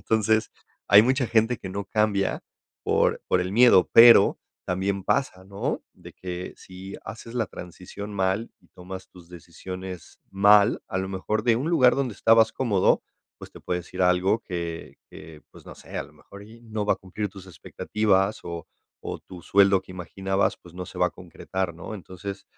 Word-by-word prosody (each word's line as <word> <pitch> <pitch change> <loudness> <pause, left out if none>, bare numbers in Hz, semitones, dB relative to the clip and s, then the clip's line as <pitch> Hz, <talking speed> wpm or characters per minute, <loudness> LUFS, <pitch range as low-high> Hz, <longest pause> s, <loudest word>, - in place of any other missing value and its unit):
entonces, 110 0 +1 0.4
hay 100 +2 +8
mucha 130 +1 +1
gente 115 +2 +2
que 95 - -8
no 100 +1 -4
cambia 105 -1 0 0.4
por - - +1
por 90 - +2
el 90 - -3
miedo, 120 -4 +6
pero 115 -3 +8 0.3
también 95 +1 -1
pasa, 95 -8 -1
¿no?, 100 +1 -4
de - - -14
que 90 0 -7
si 95 +1 -11
haces 115 +4 -9
la 115 -4 0
transición 90 +4 -9
mal 95 +4 -1
y - - -27
tomas 95 +1 -10
tus 85 -2 -17
decisiones 90 +1 -9
mal, 100 +2 +5
a 95 - -3
lo 95 0 -3
mejor 105 +3 -2
de 115 -1 +3
un 140 +7 -2
lugar 130 -8 +4
donde 130 -6 -2
estabas 115 0 +4
cómodo, 105 -8 +2 0.4
pues - - -11
te - - -13
puedo 90 0 -2
decir 90 +2 -9
algo 90 +4 +3
que 85 -3 -6
que, 75 -1 -12
pues - - -17
no - - -10
sé, - - -11
a - - -3
lo - - -18
mejor 100 +1 -14
y 115 +2 -15
no 110 -2 -4
va - - +4
a - - -3
cumplir 100 +3 -5
tus 95 -1 -13
expectativas 100 +2 -1
o 85 -2 -6 0.4
o - - -5
tu 90 -2 -12
sueldo 100 0 +4
que - - -17
imaginabas, 95 +2 -2
pues 85 - -16
no 90 0 -6
se - - -10
va - - +4
a - - -4
concretar, 95 -3 -5
¿no?, 90 +5 -8
entonces, 95 +1 -8
95 Hz, 185 wpm, -25 LUFS, 90-110 Hz, 0.4 s, hay